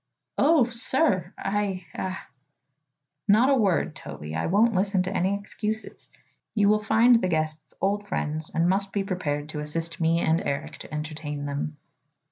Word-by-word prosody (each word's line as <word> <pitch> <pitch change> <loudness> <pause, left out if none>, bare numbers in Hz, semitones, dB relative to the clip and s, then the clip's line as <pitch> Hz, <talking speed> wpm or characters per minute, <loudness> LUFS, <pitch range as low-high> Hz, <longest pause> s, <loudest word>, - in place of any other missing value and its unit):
"Oh, 300 -4 +5
sir! 230 - +1
I 195 -2 -2
I 185 -1 -3 0.6
" 145 +1 -55 0.3
"Not 220 +6 +5
a - - +5
word, 200 -8 +1
Toby. 75 +1 -8
I 80 - -1
won't 220 +6 +4
listen 195 -1 +1
to 185 - -4
any 190 +3 +1
excuses. 215 +2 -5 0.5
You 205 -2 +4
will 215 0 +4
find 230 +2 +5
the - - +1
guests 155 -2 -2
old 205 +1 0
friends 155 -4 -2
and 165 +2 +2
must 195 +1 +1
be 200 - 0
prepared 150 -6 -2
to 150 - -5
assist 165 +3 -3
me 165 +1 +3
and 160 0 +2
Eric 140 0 -3
to - - -11
entertain 150 -1 -5
them." 145 +1 -3
185 Hz, 165 wpm, -26 LUFS, 155-205 Hz, 0.6 s, Oh